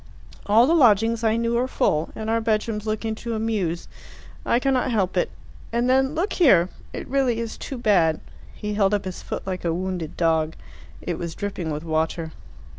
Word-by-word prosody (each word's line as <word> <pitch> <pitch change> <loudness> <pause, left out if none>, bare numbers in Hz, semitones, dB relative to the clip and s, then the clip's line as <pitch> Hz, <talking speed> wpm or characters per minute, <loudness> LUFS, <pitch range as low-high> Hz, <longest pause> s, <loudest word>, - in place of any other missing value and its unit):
All 220 +4 +6
the 315 - +3
lodgings 230 -5 +4
I 220 -1 +3
knew 230 0 0
are 255 - 0
full, 155 -10 +1
and 220 - -5
our 230 +1 +1
bedrooms 215 -1 -1
look 215 +1 -2
into 225 +1 -3
a - - -2
mews. 200 -7 -1 0.6
I - - +2
cannot 260 -1 +1
help 195 -6 0
it. 180 - +1 0.4
And 235 +1 +1
then 265 +3 +2
look 360 +6 0
here! 190 - +5 0.2
It - - -6
really 260 -3 +1
is 230 -1 -4
too 270 - -6
bad." 180 -9 +3 0.4
He 210 -1 -4
held 205 -1 +3
up 200 - -3
his 185 -1 -5
foot - - -5
like 185 -1 -4
a 165 -1 0
wounded 180 -3 -4
dog. 160 -2 +1 0.5
It 175 -2 -3
was 170 -2 -5
dripping 195 -5 -4
with 150 0 -3
water. 160 0 -1
215 Hz, 190 wpm, -24 LUFS, 175-235 Hz, 0.6 s, All